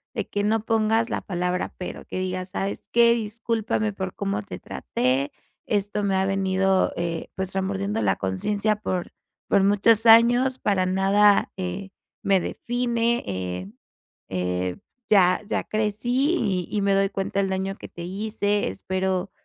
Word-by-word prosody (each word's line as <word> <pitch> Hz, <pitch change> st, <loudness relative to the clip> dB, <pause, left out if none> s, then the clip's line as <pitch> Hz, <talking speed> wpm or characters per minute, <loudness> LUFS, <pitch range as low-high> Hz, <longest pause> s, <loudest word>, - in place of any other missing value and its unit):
de -, -, -2 dB
que 205 Hz, -, -1 dB
no 215 Hz, +1 st, +1 dB
pongas 225 Hz, +1 st, +2 dB
la -, -, -1 dB
palabra, 180 Hz, -1 st, -2 dB
pero. 180 Hz, -, -7 dB
Que -, -, -5 dB
digas: 185 Hz, 0 st, -3 dB
¿Sabes 195 Hz, +1 st, -2 dB
qué? 235 Hz, 0 st, +6 dB
Discúlpame 220 Hz, -1 st, -1 dB
por 190 Hz, -1 st, -5 dB
cómo 195 Hz, -, -2 dB
te -, -, -7 dB
traté. 130 Hz, +3 st, -1 dB, 0.3 s
Esto 205 Hz, 0 st, -1 dB
me 195 Hz, -1 st, +1 dB
ha 190 Hz, 0 st, +2 dB
venido, 195 Hz, 0 st, +1 dB
eh, 170 Hz, -1 st, -3 dB
pues, 190 Hz, 0 st, -3 dB
remordiendo 195 Hz, +3 st, -1 dB
la -, -, +2 dB
conciencia, 200 Hz, -, 0 dB
por 185 Hz, -4 st, -3 dB, 0.4 s
por 195 Hz, -, +4 dB
muchos 205 Hz, +3 st, +4 dB
años. 240 Hz, +3 st, +6 dB
Para 190 Hz, -3 st, +1 dB
nada, 195 Hz, +2 st, +4 dB
eh, 190 Hz, +1 st, -4 dB, 0.3 s
me 195 Hz, -1 st, +4 dB
define, 235 Hz, +3 st, -1 dB
eh 95 Hz, -1 st, -4 dB, 0.6 s
eh, 90 Hz, -1 st, -2 dB, 0.3 s
ya 185 Hz, -3 st, +5 dB
ya -, -, -1 dB
crecí, 240 Hz, -, 0 dB
y 185 Hz, -6 st, -1 dB
y 205 Hz, -, +1 dB
me 200 Hz, 0 st, +2 dB
doy 195 Hz, 0 st, +3 dB
cuenta 195 Hz, 0 st, -2 dB
el 195 Hz, -, +2 dB
daño 190 Hz, +1 st, -2 dB
que -, -, -10 dB
te 170 Hz, -, -9 dB
hice. 205 Hz, +2 st, -1 dB
Espero, 190 Hz, 0 st, -2 dB
195 Hz, 155 wpm, -24 LUFS, 185-215 Hz, 0.6 s, qué